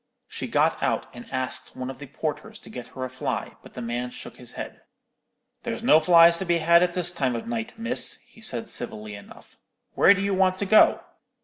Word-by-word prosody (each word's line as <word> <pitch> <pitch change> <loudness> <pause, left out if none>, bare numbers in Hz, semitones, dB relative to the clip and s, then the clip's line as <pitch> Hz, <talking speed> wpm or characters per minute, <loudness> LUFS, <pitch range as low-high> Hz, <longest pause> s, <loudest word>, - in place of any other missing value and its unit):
She - - -5
got - - +1
out - - 0
and 120 0 -12
asked 130 -1 -4
one 130 +1 -5
of 135 - -13
the 145 - -9
porters 160 +10 -5
to - - -12
get 125 - -8
her 130 - -3
a - - -6
fly; 130 - -4
but - - -16
the 125 - -5
man 120 +1 -3
shook - - -10
his - - -10
head. - - -8 0.8
"There's - - -5
no 155 - +6
flies 170 +1 +6
to 190 - -3
be 170 -1 +2
had 170 +1 +5
at 180 -1 +1
this 175 -1 +1
time 130 -8 -1
of 115 - -5
night, 230 0 -4
miss," 230 +2 +1
he 235 -1 -19
said, 225 0 -2
civilly 110 -3 -4
enough. 100 0 -14 0.3
"Where 200 - +6
do 195 - -3
you 200 0 0
want 185 -1 +2
to 200 - -1
go?" 215 +2 +5
170 Hz, 220 wpm, -25 LUFS, 130-195 Hz, 0.8 s, no